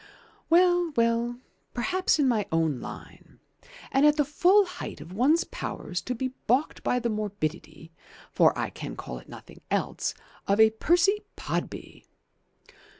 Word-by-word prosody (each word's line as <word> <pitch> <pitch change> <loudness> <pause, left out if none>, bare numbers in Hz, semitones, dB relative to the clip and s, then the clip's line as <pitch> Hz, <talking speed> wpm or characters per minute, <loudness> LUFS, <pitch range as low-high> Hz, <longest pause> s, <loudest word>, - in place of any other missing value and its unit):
"Well, 350 -1 +4
well, 230 +1 +1 0.4
perhaps 370 +11 +1
in 290 -3 +3
my 220 -5 +1
own 160 -5 +1
line. - - -11 0.5
And 270 +1 +3
at 300 0 +6
the 295 - +3
full 365 +8 +4
height 360 - -7
of 165 +5 -10
one's 280 - +3
powers 180 - -5
to 250 - -4
be 260 +2 -2 0.2
baulked 255 +7 +1
by 250 - +1
the 240 -1 -1
morbidity, 170 -6 -4 0.4
for - - +4
I - - -2
can - - -7
call 60 - -7
it - - -18
nothing - - -13
else, - - -1 0.3
of 200 +2 +2
a 220 0 +7
Percy 345 - +2 0.2
Podby! - - -5
240 Hz, 150 wpm, -27 LUFS, 200-325 Hz, 0.5 s, a